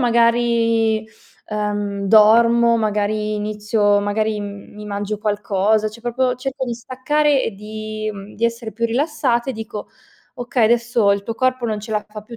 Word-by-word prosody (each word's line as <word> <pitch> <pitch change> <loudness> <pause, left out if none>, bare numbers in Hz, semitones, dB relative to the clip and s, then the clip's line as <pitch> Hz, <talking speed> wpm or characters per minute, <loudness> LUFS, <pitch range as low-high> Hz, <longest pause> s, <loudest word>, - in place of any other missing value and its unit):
magari, 230 -2 +2 0.4
uhm, 205 -1 -2
dormo, 230 +3 +5
magari 215 0 -1
inizio 210 0 +1
magari 210 +1 -1
m 200 0 -8
mi 210 0 -9
mangio 205 0 -4
qualcosa, 210 0 +1
cioè 215 +2 -13
proprio 250 +1 0
cerco 265 +1 -4
di 240 -2 -3
staccare 270 +4 0
e - - -2
di 215 +1 -5
mhmm, 200 +1 -10
di 230 - -2
essere 235 -2 -2
più 230 +3 -3
rilassata 255 0 0
e - - -4
dico: 220 -2 -7 0.5
"Okay, 245 -1 0
adesso 235 -2 +2
il 200 0 -2
tuo 225 +2 -4
corpo 255 0 0
non 215 -2 -2
ce 215 - -9
la 210 -1 -1
fa 210 0 -9
più. 230 +2 -11
220 Hz, 165 wpm, -20 LUFS, 210-235 Hz, 0.5 s, dormo